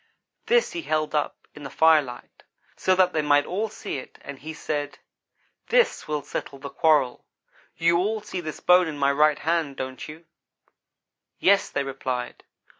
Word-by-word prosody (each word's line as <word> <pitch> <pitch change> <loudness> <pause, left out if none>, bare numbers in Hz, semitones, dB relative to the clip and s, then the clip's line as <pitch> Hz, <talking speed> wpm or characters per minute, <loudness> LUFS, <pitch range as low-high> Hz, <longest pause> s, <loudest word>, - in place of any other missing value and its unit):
This 480 0 +3
he 340 - -4
held 155 - -1
up 150 -1 -2
in 150 - -12
the 140 - -7
firelight, 150 -7 +1 0.3
so 185 - +2
that 185 -1 +3
they 155 - +1
might 145 -1 +3
all 210 +5 -2
see 200 - -5
it, - - -13
and 140 -1 -9
he 155 +4 -7
said: 145 -2 -4 0.7
"'This - - +2
will 150 -1 -2
settle 140 0 -6
the 140 +1 -8
quarrel. 150 -6 +2 0.5
You 170 +1 +3
all 215 +4 0
see 185 -3 -5
this 155 -2 -6
bone 180 0 +5
in 155 -2 -5
my 140 0 +2
right 150 +1 +3
hand, 160 -2 -1
don't 130 -1 -6
you?' 160 +2 -11 1.1
"'Yes,' 200 +1 +3
they 140 - -1
replied. 130 -2 -4
155 Hz, 170 wpm, -25 LUFS, 140-180 Hz, 1.1 s, bone